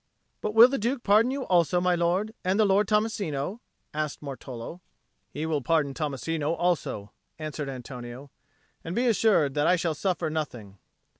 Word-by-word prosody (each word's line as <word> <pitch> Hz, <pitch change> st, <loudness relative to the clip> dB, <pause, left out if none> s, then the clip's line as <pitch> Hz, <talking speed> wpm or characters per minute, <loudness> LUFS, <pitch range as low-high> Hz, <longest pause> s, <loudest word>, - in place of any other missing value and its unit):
"But 215 Hz, 0 st, -3 dB
will 230 Hz, +2 st, +10 dB
the 275 Hz, +2 st, -2 dB
Duke 240 Hz, +3 st, -1 dB
pardon 215 Hz, +4 st, +4 dB
you 270 Hz, +1 st, -2 dB
also, 175 Hz, -, +3 dB
my 180 Hz, 0 st, +2 dB
lord, 175 Hz, +5 st, 0 dB
and 190 Hz, +3 st, +1 dB
the 215 Hz, -, +5 dB
Lord 200 Hz, +1 st, +3 dB
Tommasino?" 210 Hz, -5 st, -1 dB, 0.3 s
asked 150 Hz, -1 st, -3 dB
Martolo. 135 Hz, +2 st, -8 dB, 0.5 s
"He 150 Hz, -, -4 dB
will 155 Hz, -3 st, 0 dB
pardon 145 Hz, +1 st, +1 dB
Tommasino 150 Hz, +1 st, -2 dB
also," 145 Hz, -, -1 dB, 0.3 s
answered 155 Hz, -2 st, -5 dB
Antonio. 125 Hz, +1 st, -8 dB, 0.5 s
"And 165 Hz, +2 st, -5 dB
be 245 Hz, -, +1 dB
assured 210 Hz, -, +3 dB
that 145 Hz, +2 st, +1 dB
I 180 Hz, -, +5 dB
shall 170 Hz, -2 st, -1 dB
suffer 165 Hz, 0 st, -1 dB
nothing." 120 Hz, -11 st, -5 dB
165 Hz, 160 wpm, -27 LUFS, 145-200 Hz, 0.5 s, will